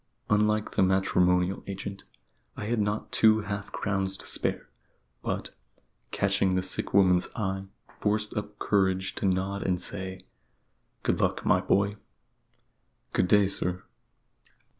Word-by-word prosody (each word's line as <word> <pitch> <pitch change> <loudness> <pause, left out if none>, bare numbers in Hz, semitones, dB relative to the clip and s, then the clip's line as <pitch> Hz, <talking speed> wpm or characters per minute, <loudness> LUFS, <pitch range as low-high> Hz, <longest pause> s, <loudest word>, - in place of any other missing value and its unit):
Unlike 105 0 +2
the - - +1
matrimonial 90 -1 +2
agent, 100 0 -6 0.5
I - - -4
had 115 +1 0
not 105 +1 -2
two 110 0 +4
half 100 -1 -5
crowns 95 -1 -1
to - - -7
spare; - - +1 0.5
but, - - -3 0.6
catching 100 -1 +1
the 95 - 0
sick 95 - 0
woman's 90 -2 +4
eye, 95 -3 -2 0.3
forced 105 0 0
up 105 -1 -5
courage 95 -2 +1
to 100 - -1
nod 95 +2 -1
and 90 -1 0
say 95 0 -4 0.8
"Good - - 0
luck, - - 0
my - - +4
boy." 100 +1 +1 1.2
"Good 90 - +2
day, 105 +1 +5
sir." 90 -2 0
95 Hz, 130 wpm, -28 LUFS, 95-105 Hz, 1.2 s, day